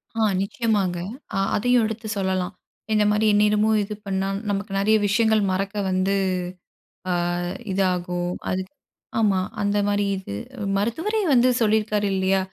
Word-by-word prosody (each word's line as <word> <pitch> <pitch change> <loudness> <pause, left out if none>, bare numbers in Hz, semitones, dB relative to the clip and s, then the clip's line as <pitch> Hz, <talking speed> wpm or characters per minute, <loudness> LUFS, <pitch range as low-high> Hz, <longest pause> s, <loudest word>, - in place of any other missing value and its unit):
ஆ. 225 - 0 0.2
நிச்சயமாங்க. 200 -3 0 0.4
அ - - 0 0.2
அதையும் 245 +2 +3
எடுத்து 220 0 -4
சொல்லலாம். 190 -1 -1 0.4
இந்தமாரி 210 0 +3
எந்நேரமும் 210 +1 +3
இது 210 +1 -5
பண்ணா 195 0 -1 0.2
நமக்கு 200 0 -2
நெறைய 215 +2 +4
விஷயங்கள் 220 +1 +3
மறக்க 195 +2 -2
வந்து 185 +1 +1 1.0
அ - - +2 0.6
இதாகும். 180 -2 0 0.2
அதுக் 185 0 -3 0.5
ஆமா, 200 -4 +3 0.2
அந்தமாரி 205 0 +1
இது. 190 - -7 0.4
மருத்துவரே 320 - -1
வந்து 250 +1 +5
சொல்லியிருக்காரு 215 -2 +2
இல்லயா! 190 0 +2
205 Hz, 120 wpm, -23 LUFS, 190-220 Hz, 1.0 s, வந்து